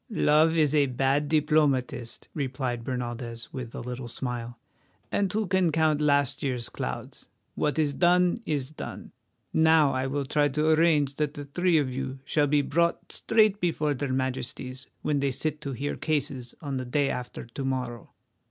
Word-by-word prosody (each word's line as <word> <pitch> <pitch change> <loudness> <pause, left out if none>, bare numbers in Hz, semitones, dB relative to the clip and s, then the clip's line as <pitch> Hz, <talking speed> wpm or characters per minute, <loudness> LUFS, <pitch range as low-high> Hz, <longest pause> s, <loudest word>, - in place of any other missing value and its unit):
"Love 160 -5 +3
is 150 -2 +3
a 145 -2 +4
bad 135 +3 +1
diplomatist," 145 -6 +1
replied 130 -4 -2
Bernaldez, 120 -2 -4
with 125 -4 -6
a - - -4
little 125 0 -5
smile, 120 0 -5 0.5
"and 200 -2 +1
who 215 +1 0
can 185 -3 +2
count 155 -1 +2
last 145 -2 +2
year's 125 -4 -2
clouds? - - -6 0.3
What 150 0 0
is 150 -2 +2
done, 180 - +3
is 145 -2 -1
done. 155 - -8 0.4
Now 160 -2 +5
I 130 0 -1
will 140 +1 -2
try 145 +2 +2
to 150 +3 +1
arrange 155 -3 +4
that 150 -1 -1
the 145 - -6
three 175 +4 +2
of 135 -4 0
you 135 +1 -4
shall 145 0 +2
be 145 0 +3
brought 170 +4 0
straight 215 -2 +3
before 155 -4 +1
their 140 0 -3
Majesties 130 0 -3 0.2
when 150 -2 +1
they 140 0 +1
sit 150 +3 -3
to 140 -2 -4
hear 140 +4 -3
cases 140 -5 -2
on 140 -3 -3
the 130 - -3
day 140 +3 +1
after 125 -1 -5
to 120 +4 -6
morrow. 125 -3 -3
145 Hz, 170 wpm, -27 LUFS, 130-155 Hz, 0.5 s, Now